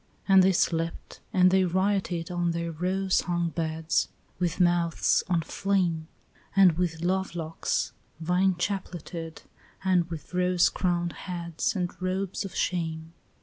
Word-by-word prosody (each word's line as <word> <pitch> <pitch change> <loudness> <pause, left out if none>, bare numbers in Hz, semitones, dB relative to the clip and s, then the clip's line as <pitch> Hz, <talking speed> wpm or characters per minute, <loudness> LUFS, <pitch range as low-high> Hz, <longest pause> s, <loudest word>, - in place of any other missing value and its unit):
And 195 -1 +7
they 190 +1 +5
slept 165 -2 -1
and 185 0 +5
they 190 0 +4
rioted 185 -2 0
on 175 -1 0
their 170 0 -2
rose 185 +4 0
hung 175 -1 -1
beds, 160 -1 -1 0.3
With 175 -1 -1
mouths 175 -2 +3
on 170 -2 +2
flame, 175 -3 0 0.5
And 195 -2 +7
with 165 -1 -2
love 190 0 0
locks 165 -1 -2 0.3
vine 180 +3 +2
chapleted, 175 -3 -4 0.4
and 180 -3 +2
with 165 +1 -8
rose 180 -1 +3
crowned 175 -2 -1 0.2
heads 170 +1 -2
And 180 -2 -1
robes 185 +1 -2
of 195 - -7
shame. 165 -2 -2
175 Hz, 135 wpm, -27 LUFS, 165-185 Hz, 0.5 s, And